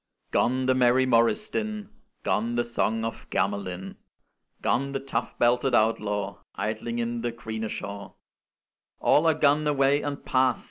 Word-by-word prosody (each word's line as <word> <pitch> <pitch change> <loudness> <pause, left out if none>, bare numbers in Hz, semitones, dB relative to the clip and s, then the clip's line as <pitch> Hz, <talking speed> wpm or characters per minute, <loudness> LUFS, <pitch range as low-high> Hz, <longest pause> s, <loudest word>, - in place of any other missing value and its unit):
Gone, 130 +1 +2
the 130 - +4
merry 130 0 +4
morris 120 - +3
din; 215 -1 -3 0.3
Gone, 115 +3 0
the 120 - +2
song 115 -1 -1
of 115 - -6
Gamelyn; 95 -2 -2 0.7
Gone, 140 +2 +1
the 135 - -1
tough 135 0 -3
belted 120 +1 +3
outlaw 105 -3 0 0.2
Idling 110 +2 -3
in 120 0 -2
the 120 0 -1
"grene 110 -2 -5
shawe"; 100 -1 -6 0.8
All 160 +3 +4
are 160 - +4
gone 150 0 +3
away 140 0 +3
and 145 -1 -5
past! 130 -2 +2
120 Hz, 145 wpm, -26 LUFS, 110-135 Hz, 0.8 s, the